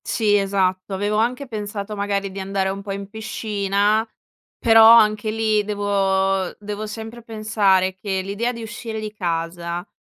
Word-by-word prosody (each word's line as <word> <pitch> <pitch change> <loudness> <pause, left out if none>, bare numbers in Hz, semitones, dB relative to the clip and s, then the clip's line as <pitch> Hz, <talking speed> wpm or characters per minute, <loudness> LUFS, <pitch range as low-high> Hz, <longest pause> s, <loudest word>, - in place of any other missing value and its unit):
Sì, 210 -3 +2
esatto. 195 -1 0
Avevo 205 +2 -1
anche 250 +5 0
pensato 210 -2 -5
magari 200 -1 -2
di 195 - -7
andare 190 0 -1
un 195 +1 -4
po' 200 0 -6
in 200 0 -5
piscina, 210 0 0 0.5
però 225 -1 +7
anche 215 -2 +5
lì, 215 -1 +1
devo 195 -2 0
devo 210 +1 -5
sempre 225 +2 -8
pensare 210 -4 +1
che 190 0 -3
l'idea 200 +6 -2
di 230 -2 -8
uscire 225 0 -6
di 215 -1 -6
casa, 170 -1 -3
205 Hz, 150 wpm, -21 LUFS, 195-220 Hz, 0.5 s, però